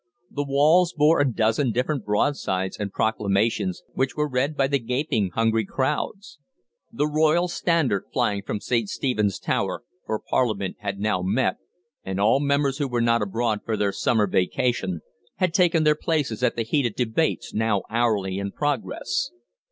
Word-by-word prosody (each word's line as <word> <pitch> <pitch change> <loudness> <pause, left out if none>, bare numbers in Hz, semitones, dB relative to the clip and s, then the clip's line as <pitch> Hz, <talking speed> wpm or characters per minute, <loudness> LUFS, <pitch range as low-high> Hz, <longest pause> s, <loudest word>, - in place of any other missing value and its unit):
The 145 - -2
walls 155 +6 +3
bore 150 +2 +4
a 140 -2 +2
dozen 115 +3 +1
different 125 +2 -1
broadsides 105 -4 0
and 105 -2 -4
proclamations, 105 -3 0
which 135 0 -1
were 150 0 0
read 140 +3 -1
by 135 - +3
the 140 +1 +1
gaping, 125 -4 -1
hungry 115 -1 +2
crowds. 150 - -3 0.5
The 190 -10 0
Royal 155 +3 +2
Standard 165 - 0
was - - -39
flying 100 +8 0
from 105 +1 -4
St. 115 -4 0
Stephen's 105 -7 0
Tower, - - -2 0.2
for 110 - 0
Parliament 105 -7 -1
had 100 -1 -4
now 105 -3 0
met, 95 +2 +1 0.5
and 95 0 -4
all 110 +6 +4
members 140 0 +1
who 145 - 0
were 120 -2 -1
not 115 0 +2
abroad 110 +2 -1
for 110 -1 -2
their 100 -1 +1
summer 105 +2 +1
vacation 95 -1 0 0.3
had 185 -3 0
taken 170 -4 +3
their 150 0 +5
places 150 -8 -1
at 125 - +2
the 115 - -1
heated 120 -1 0
debates 125 +6 -1
now 110 -2 +1
hourly 105 -5 0
in 100 0 -3
progress. 145 - -2
120 Hz, 165 wpm, -24 LUFS, 105-145 Hz, 0.5 s, their